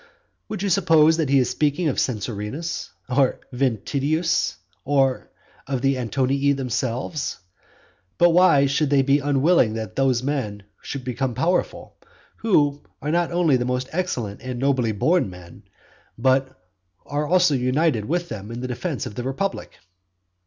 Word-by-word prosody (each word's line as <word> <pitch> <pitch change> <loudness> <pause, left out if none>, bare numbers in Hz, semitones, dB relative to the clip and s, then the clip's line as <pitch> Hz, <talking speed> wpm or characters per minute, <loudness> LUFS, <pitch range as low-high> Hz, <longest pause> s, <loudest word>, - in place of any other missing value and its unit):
Would 205 -3 -4
you 200 - 0
suppose 165 -4 +4
that 160 -5 0
he 140 - +4
is 125 -2 +2
speaking 150 +3 0
of 140 - 0
Censorinus, 115 +7 -3 0.2
or 130 0 +2
of - - -21 0.2
Ventidius, 140 - 0 0.3
or 135 -2 +1 0.4
of 130 -2 -2
the 135 0 +3
Antonii 135 +4 +1
themselves. 130 +2 -3 0.8
But 175 0 +5
why 165 -5 +5
should 140 +1 +1
they 140 -1 +4
be 140 +2 +3
unwilling 140 -4 +2
that 110 -4 -5
those 130 -2 +1
men 110 -8 -3 0.2
should 140 -2 -6
become 125 0 -2
powerful, 175 +8 -1 0.4
who 145 -10 +2 0.2
are 150 - -3
not 175 +1 +1
only 170 -7 +3
most 125 +1 -2
excellent 125 - -3
and 125 -1 -5
nobly 130 -4 +1
born 155 - +1
men, 90 -1 -13 0.5
but 130 +2 +2 0.6
who - - -26
are 145 +1 -1
also 180 -2 +4
united 130 -2 +1
with 175 +5 -1
them 105 -2 -7
in 115 +1 -6
the 125 - -4
defence 135 +4 -3
of 120 - -6
the 125 - -5
republic? 135 +10 -3
135 Hz, 150 wpm, -23 LUFS, 125-155 Hz, 0.8 s, But